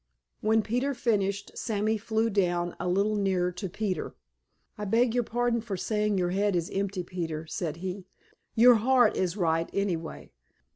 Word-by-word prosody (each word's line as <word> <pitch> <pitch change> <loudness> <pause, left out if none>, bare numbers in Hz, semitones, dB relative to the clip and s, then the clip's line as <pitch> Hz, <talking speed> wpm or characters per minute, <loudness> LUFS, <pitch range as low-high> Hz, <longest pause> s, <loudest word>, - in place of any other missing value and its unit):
When 220 +1 +2
Peter 250 +6 -1
finished, 200 -4 0
Sammy 215 0 0
flew 220 +1 0
down 175 -3 0
a - - -2
little 200 +4 +2
nearer 190 -3 +1
to 180 +2 -5
Peter. 195 0 -3 0.6
"I 210 - -6
beg 230 +3 +2
your 245 0 +2
pardon 240 +1 0
for 210 -4 -4
saying 210 +1 0
your 175 -1 0
head 200 +1 +1
is 170 -1 -1
empty, 195 -1 -2
Peter," 165 -3 -4
said 160 -1 -3
he. 185 0 -5 0.5
"Your 240 +1 +7
heart 245 0 +4
is 185 +1 -1
right, 165 -2 +1
anyway. 175 -5 -3
200 Hz, 160 wpm, -28 LUFS, 180-220 Hz, 0.6 s, Your